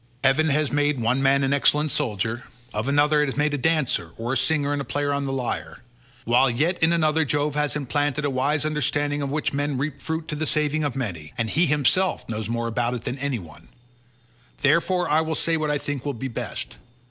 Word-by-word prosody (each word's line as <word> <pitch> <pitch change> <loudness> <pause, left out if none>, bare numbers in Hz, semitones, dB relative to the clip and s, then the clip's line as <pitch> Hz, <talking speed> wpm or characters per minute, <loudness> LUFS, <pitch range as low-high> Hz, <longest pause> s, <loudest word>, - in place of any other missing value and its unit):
Heaven 140 +4 +3
has 150 +1 +1
made 145 -1 +1
one 120 +3 +1
man 140 0 +3
an 135 +1 +1
excellent 150 +1 +3
soldier; 110 +2 -2 0.3
of 110 +4 -2
another 145 +1 +3
it 150 - +1
has 135 - -4
made 150 0 +1
a - - +1
dancer 150 - +1
or 120 +3 -2
a - - 0
singer 145 +2 +1
and 140 -3 -3
player 145 0 0
on 140 0 -1
the 135 - -2
lyre; 130 -1 -4 0.4
while 125 +3 +4
yet 155 +10 0
in 160 +1 +4
another 160 -1 +2
Jove 150 0 0
has 150 0 0
implanted 145 +1 -1
a - - +1
wise 140 +4 0
understanding 145 -1 0
of 140 - -2
which 150 +1 -1
men 145 -1 -1
reap 140 +1 -3
fruit 160 0 -3
to 150 - -2
the 155 +1 -1
saving 150 +1 +2
of 145 -3 -2
many, 85 - -4
and 115 -1 -1
he 170 +3 +3
himself 150 +6 +1
knows 110 -1 -4
more 115 0 -1
about 120 +1 -1
it 120 - -6
than 130 - -4
any 140 -2 -1
one; 85 -7 -13 0.9
therefore 170 +5 +2
I 155 +2 +3
will 160 0 -2
say 165 +2 +1
what 155 -1 -1
I 150 - +1
think 145 -2 -4
will 145 -2 -3
be 130 +4 -4
best. 115 - -5
145 Hz, 220 wpm, -24 LUFS, 130-150 Hz, 0.9 s, while